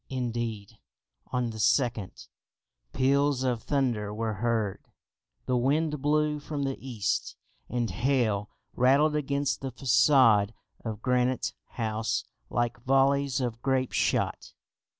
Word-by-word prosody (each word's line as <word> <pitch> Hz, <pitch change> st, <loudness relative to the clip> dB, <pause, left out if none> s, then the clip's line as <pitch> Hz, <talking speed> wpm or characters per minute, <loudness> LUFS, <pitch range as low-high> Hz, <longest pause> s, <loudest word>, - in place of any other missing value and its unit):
Indeed, 115 Hz, -4 st, -4 dB, 0.5 s
on 125 Hz, -2 st, -1 dB
the 110 Hz, -, -8 dB
2nd, 115 Hz, -4 st, 0 dB, 0.6 s
peals 140 Hz, -, +2 dB
of 125 Hz, -3 st, 0 dB
thunder 120 Hz, -8 st, 0 dB
were 110 Hz, +1 st, -2 dB
heard, 110 Hz, -1 st, -1 dB, 0.6 s
the 125 Hz, -, 0 dB
wind 150 Hz, +4 st, +1 dB
blew 150 Hz, +1 st, +1 dB
from 145 Hz, -1 st, -4 dB
the 135 Hz, -1 st, -1 dB
east, 120 Hz, -6 st, -2 dB, 0.3 s
and 120 Hz, -1 st, -1 dB
hail 110 Hz, -1 st, 0 dB, 0.2 s
rattled 140 Hz, +5 st, +4 dB
against 140 Hz, -1 st, -1 dB
the 135 Hz, -1 st, -4 dB
façade 120 Hz, -4 st, +4 dB, 0.3 s
of 110 Hz, -2 st, -5 dB
Granite 125 Hz, 0 st, +1 dB, 0.2 s
House 110 Hz, -1 st, -1 dB, 0.3 s
like 120 Hz, +1 st, -1 dB
volleys 135 Hz, +1 st, +2 dB
of 120 Hz, -3 st, -3 dB
grape 130 Hz, -1 st, 0 dB
shot. -, -, 0 dB
125 Hz, 115 wpm, -28 LUFS, 115-140 Hz, 0.6 s, rattled